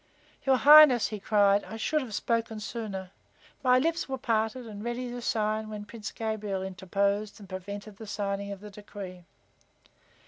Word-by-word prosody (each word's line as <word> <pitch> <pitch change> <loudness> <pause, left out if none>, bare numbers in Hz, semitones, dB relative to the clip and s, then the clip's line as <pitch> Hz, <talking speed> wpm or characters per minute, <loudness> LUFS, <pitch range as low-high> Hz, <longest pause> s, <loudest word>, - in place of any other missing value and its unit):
"Your 265 - +6
Highness," 295 -4 +8
he 215 -2 -6
said, 205 -1 +4
"I 225 - -8
should 305 +7 0
have 230 -6 -6
spoken 230 -1 -1
sooner. 205 -4 -5 0.5
My 255 -1 +5
lips 330 +4 0
were 265 - -2
parted 225 +1 -1
and 210 -2 -8
ready 240 +1 -3
to 245 0 -6
cry 215 -1 0
out 220 - -7
when 210 -1 -7
Prince 215 0 -7
Gabriel 215 -4 -3
interposed 200 +3 -1
and 200 - -12
prevented 200 +2 -7
the 220 - -9
signing 200 -1 -3
of 200 -1 -7
the 210 0 -10
decree. 195 -3 -9
215 Hz, 170 wpm, -28 LUFS, 200-235 Hz, 0.5 s, Highness